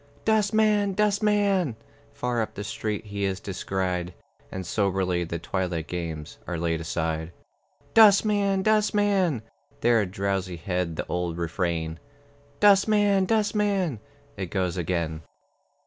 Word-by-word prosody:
"Dustman, 215 Hz, -1 st, +3 dB
dustman!" 205 Hz, -, +2 dB, 0.4 s
Far 125 Hz, -4 st, -1 dB
up 110 Hz, -, -4 dB
the 105 Hz, -, -5 dB
street 110 Hz, 0 st, -4 dB
he 100 Hz, -1 st, -4 dB
is 95 Hz, -1 st, -1 dB
descried, 90 Hz, -2 st, -3 dB, 0.4 s
And 95 Hz, -1 st, -5 dB
soberly 95 Hz, -2 st, 0 dB
the 85 Hz, 0 st, -4 dB
twilight 85 Hz, -1 st, -2 dB
games 80 Hz, -4 st, -5 dB
Are 85 Hz, -, -3 dB
laid 80 Hz, -1 st, -1 dB
aside. 80 Hz, 0 st, -2 dB, 0.6 s
"Dustman, 205 Hz, -2 st, +5 dB
dustman!" 205 Hz, -, +2 dB, 0.4 s
There, 115 Hz, -2 st, +4 dB
Drowsyhead, 90 Hz, -3 st, -2 dB
the -, -, -3 dB
old 90 Hz, -1 st, -2 dB
refrain, 85 Hz, -1 st, -2 dB, 0.6 s
"Dustman, 205 Hz, -1 st, +4 dB
dustman!" 205 Hz, -, +1 dB, 0.4 s
It 95 Hz, -3 st, -4 dB
goes 90 Hz, -2 st, -1 dB
again. 85 Hz, -2 st, -2 dB
100 Hz, 110 wpm, -26 LUFS, -, 0.6 s, Dustman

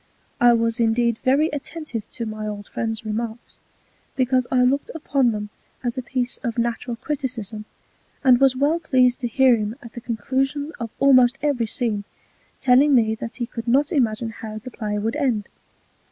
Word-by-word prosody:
I 240 Hz, 0 st, +6 dB
was 230 Hz, 0 st, +1 dB
indeed 235 Hz, 0 st, +2 dB
very 285 Hz, +5 st, +2 dB
attentive 290 Hz, -6 st, -6 dB
to 235 Hz, -, -3 dB
my 215 Hz, -1 st, -5 dB
old 205 Hz, -1 st, -6 dB
Friend's 225 Hz, -1 st, -4 dB
Remarks, 225 Hz, +2 st, -5 dB, 0.6 s
because 255 Hz, -1 st, +1 dB
I 250 Hz, -1 st, +4 dB
looked 270 Hz, +3 st, +1 dB
upon 275 Hz, -6 st, +1 dB
them 210 Hz, -1 st, -5 dB, 0.3 s
as 240 Hz, -1 st, -1 dB
a 260 Hz, -, -2 dB
Piece 250 Hz, 0 st, -2 dB
of 235 Hz, -2 st, -4 dB
natural 235 Hz, +1 st, -1 dB
Criticism, 230 Hz, -6 st, -4 dB, 0.6 s
and 255 Hz, -2 st, +6 dB
was 270 Hz, -1 st, +4 dB
well 290 Hz, +5 st, +2 dB
pleased 255 Hz, -6 st, +2 dB
to 245 Hz, -, 0 dB
hear 255 Hz, +1 st, +4 dB
him 210 Hz, +1 st, -3 dB
at 235 Hz, -, -11 dB
the 240 Hz, -, -7 dB
Conclusion 265 Hz, +6 st, -2 dB
of 230 Hz, -1 st, -4 dB
almost 255 Hz, -2 st, +5 dB
every 265 Hz, -6 st, +1 dB
Scene, 215 Hz, -3 st, -1 dB, 0.6 s
telling 265 Hz, +3 st, +5 dB
me 220 Hz, -3 st, +3 dB
that 230 Hz, +1 st, -6 dB
he 240 Hz, -, -2 dB
could 230 Hz, 0 st, -7 dB
not 275 Hz, +4 st, +3 dB
imagine 230 Hz, -5 st, 0 dB
how 215 Hz, -1 st, -7 dB
the 235 Hz, +4 st, -9 dB
Play 210 Hz, -3 st, -3 dB
would 225 Hz, +6 st, -2 dB
end. 245 Hz, -8 st, 0 dB
240 Hz, 175 wpm, -23 LUFS, 225-265 Hz, 0.6 s, I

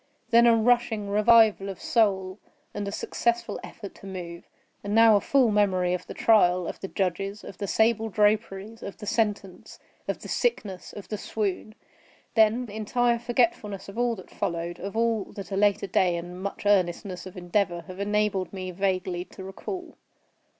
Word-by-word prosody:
Then 235 Hz, +1 st, +7 dB
a 230 Hz, -, +6 dB
rushing 225 Hz, -3 st, +1 dB
revival 215 Hz, -1 st, +5 dB
of 190 Hz, -, -7 dB
soul 195 Hz, -4 st, +1 dB, 0.3 s
and 205 Hz, -, -4 dB
a -, -, -3 dB
successful 235 Hz, +3 st, -1 dB
effort 205 Hz, -4 st, -9 dB
to 195 Hz, -, -11 dB
move. 175 Hz, -3 st, -7 dB, 0.4 s
And 205 Hz, +1 st, -2 dB
now 225 Hz, -1 st, +7 dB
a 200 Hz, -, +3 dB
full 260 Hz, -5 st, +3 dB
memory 185 Hz, -4 st, +2 dB
of 180 Hz, 0 st, -4 dB
the -, -, -8 dB
trial, 180 Hz, -5 st, +4 dB
of -, -, -6 dB
the 195 Hz, -, -5 dB
judges, 195 Hz, +2 st, -2 dB
of 185 Hz, -, -10 dB
the 200 Hz, -, -3 dB
sable 225 Hz, +1 st, +2 dB
draperies, 210 Hz, +1 st, 0 dB
of 200 Hz, -, -7 dB
the -, -, -8 dB
sentence, 205 Hz, -4 st, -2 dB, 0.3 s
of -, -, -3 dB
the -, -, -7 dB
sickness, 210 Hz, -, -2 dB
of 205 Hz, -, -10 dB
the 210 Hz, -, -4 dB
swoon. 215 Hz, 0 st, -3 dB, 0.6 s
Then 225 Hz, +2 st, +3 dB
entire 235 Hz, +3 st, 0 dB
forgetfulness 230 Hz, -4 st, 0 dB
of 200 Hz, +2 st, -10 dB
all 240 Hz, -1 st, +1 dB
that 185 Hz, -, -13 dB
followed; 170 Hz, +1 st, -3 dB
of 200 Hz, +4 st, -5 dB
all 230 Hz, -3 st, +1 dB
that 195 Hz, -3 st, -8 dB
a -, -, -1 dB
later 200 Hz, 0 st, +2 dB
day 185 Hz, -2 st, +2 dB
and 175 Hz, +2 st, -7 dB
much 200 Hz, +1 st, -5 dB
earnestness 185 Hz, -1 st, +1 dB
of 185 Hz, -, -11 dB
endeavor 175 Hz, 0 st, 0 dB
have 185 Hz, +3 st, -11 dB
enabled 205 Hz, -2 st, 0 dB
me 185 Hz, -1 st, -5 dB
vaguely 185 Hz, -1 st, -1 dB
to 190 Hz, +1 st, -11 dB
recall. 350 Hz, -, -7 dB
200 Hz, 175 wpm, -26 LUFS, 185-225 Hz, 0.6 s, Then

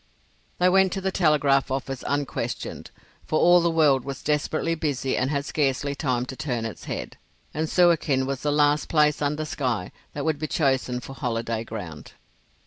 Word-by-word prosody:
They 180 Hz, -, +3 dB
went 190 Hz, 0 st, +4 dB
to 195 Hz, -, -2 dB
the 190 Hz, 0 st, -1 dB
telegraph 145 Hz, -6 st, +3 dB
office 135 Hz, 0 st, -3 dB
unquestioned, 145 Hz, -1 st, -3 dB, 0.4 s
for 155 Hz, -, +1 dB
all 175 Hz, 0 st, +6 dB
the 170 Hz, -, +2 dB
world 150 Hz, -6 st, +3 dB
was 140 Hz, -1 st, -6 dB
desperately 155 Hz, +2 st, 0 dB
busy 145 Hz, -5 st, -1 dB
and 130 Hz, -, 0 dB
had 140 Hz, -1 st, -1 dB
scarcely 140 Hz, -1 st, 0 dB
time 130 Hz, -4 st, -1 dB
to 130 Hz, -, -7 dB
turn 125 Hz, -6 st, -3 dB
its 110 Hz, -, -7 dB
head, -, -, -5 dB, 0.4 s
and 155 Hz, +1 st, -2 dB
Suakin 165 Hz, -7 st, +3 dB
was 135 Hz, -1 st, -3 dB
the 150 Hz, -, 0 dB
last 145 Hz, 0 st, +2 dB
place 150 Hz, -2 st, +3 dB
under 150 Hz, +2 st, -1 dB
sky 125 Hz, -11 st, -2 dB, 0.2 s
that 145 Hz, -, -4 dB
would 155 Hz, -2 st, 0 dB
be 155 Hz, -, -2 dB
chosen 130 Hz, -5 st, 0 dB
for 135 Hz, -, -9 dB
holiday 115 Hz, -4 st, -2 dB
ground. 90 Hz, -10 st, -8 dB
145 Hz, 175 wpm, -25 LUFS, 130-155 Hz, 0.4 s, all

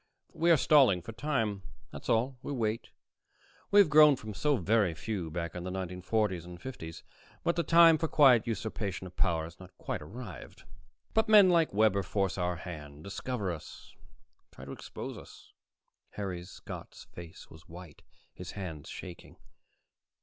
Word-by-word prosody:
We 170 Hz, +2 st, +1 dB
are 165 Hz, -, +7 dB
stalling 130 Hz, -, +4 dB
for 115 Hz, -, -7 dB
time, 115 Hz, -5 st, -2 dB, 0.3 s
that's -, -, -9 dB
all. 125 Hz, +3 st, +1 dB
We -, -, -6 dB
wait. 115 Hz, -4 st, -2 dB, 0.8 s
We 205 Hz, -, +6 dB
have 200 Hz, -, +6 dB
grown 150 Hz, -1 st, +8 dB
from 110 Hz, -3 st, -8 dB
so 145 Hz, +6 st, +1 dB
very 100 Hz, -3 st, +1 dB
few, 95 Hz, -2 st, -4 dB
back 85 Hz, +1 st, -4 dB
in 90 Hz, -, -6 dB
the 90 Hz, -, -4 dB
1940s 95 Hz, +1 st, -2 dB
and 90 Hz, 0 st, -10 dB
50s, 85 Hz, -9 st, -8 dB, 0.4 s
but 170 Hz, -, +1 dB
the 170 Hz, -, +1 dB
time 165 Hz, -1 st, +6 dB
for 160 Hz, -, 0 dB
quiet 130 Hz, -8 st, +5 dB
usurpation 105 Hz, -4 st, -4 dB
of 90 Hz, -1 st, -11 dB
power 85 Hz, -3 st, +1 dB
has 85 Hz, +2 st, -10 dB
not 95 Hz, -1 st, -14 dB
quite -, -, -4 dB
arrived. 100 Hz, -, -10 dB, 0.5 s
But 220 Hz, 0 st, +2 dB
men 205 Hz, -4 st, +8 dB
like 165 Hz, -2 st, +3 dB
Webber 105 Hz, -1 st, +3 dB
force 95 Hz, 0 st, -1 dB
our 90 Hz, 0 st, 0 dB
hand, 75 Hz, -4 st, -9 dB
discover 100 Hz, 0 st, -3 dB
us, 80 Hz, -3 st, -10 dB, 0.6 s
try 65 Hz, -, -12 dB
to 70 Hz, -, -8 dB
expose -, -, -7 dB
us." -, -, -15 dB, 0.6 s
Harry 95 Hz, -4 st, -4 dB
Scott's 90 Hz, -, -10 dB
face 85 Hz, -1 st, -12 dB
was 80 Hz, +2 st, -16 dB
white, 85 Hz, -2 st, -12 dB, 0.3 s
his 90 Hz, 0 st, -9 dB
hands 85 Hz, -7 st, -7 dB
shaking. 90 Hz, -2 st, -10 dB
100 Hz, 165 wpm, -30 LUFS, 90-130 Hz, 0.8 s, grown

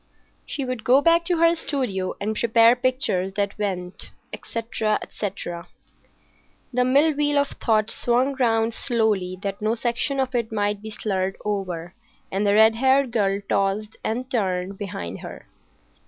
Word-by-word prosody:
She 280 Hz, -4 st, -3 dB
would 255 Hz, -3 st, -4 dB
go 255 Hz, +3 st, +5 dB
back 335 Hz, +2 st, +3 dB
to 350 Hz, -1 st, +1 dB
her 335 Hz, +1 st, +5 dB
studio 255 Hz, -, -2 dB
and 215 Hz, +2 st, -2 dB
prepare 230 Hz, +1 st, +5 dB
pictures 245 Hz, -7 st, 0 dB
that 200 Hz, 0 st, -1 dB
went, 185 Hz, -3 st, -4 dB, 0.2 s
etc., 225 Hz, -2 st, -2 dB
etc. 175 Hz, -4 st, -6 dB, 1.1 s
The 250 Hz, +1 st, +3 dB
mill 285 Hz, +5 st, +4 dB
wheel 290 Hz, 0 st, +1 dB
of 285 Hz, 0 st, +2 dB
thought 215 Hz, -2 st, 0 dB
swung 250 Hz, +3 st, +1 dB
round 225 Hz, -2 st, +2 dB
slowly, 215 Hz, -7 st, 0 dB
that 200 Hz, 0 st, -4 dB
no 215 Hz, +2 st, +1 dB
section 245 Hz, +4 st, -1 dB
of 260 Hz, -1 st, -1 dB
it 235 Hz, -2 st, -1 dB
might 205 Hz, -1 st, -1 dB
be 220 Hz, -, -7 dB
slurred 195 Hz, -3 st, -2 dB
over, 185 Hz, -4 st, -3 dB, 0.4 s
and 200 Hz, +2 st, 0 dB
the 200 Hz, -, +4 dB
red 220 Hz, +1 st, +6 dB
haired 265 Hz, +1 st, +3 dB
girl 200 Hz, -3 st, +1 dB
tossed 200 Hz, +2 st, 0 dB
and 245 Hz, +3 st, -2 dB
turned 190 Hz, -4 st, -1 dB
behind 175 Hz, -, -5 dB
her. -, -, -9 dB
220 Hz, 155 wpm, -23 LUFS, 195-255 Hz, 1.1 s, red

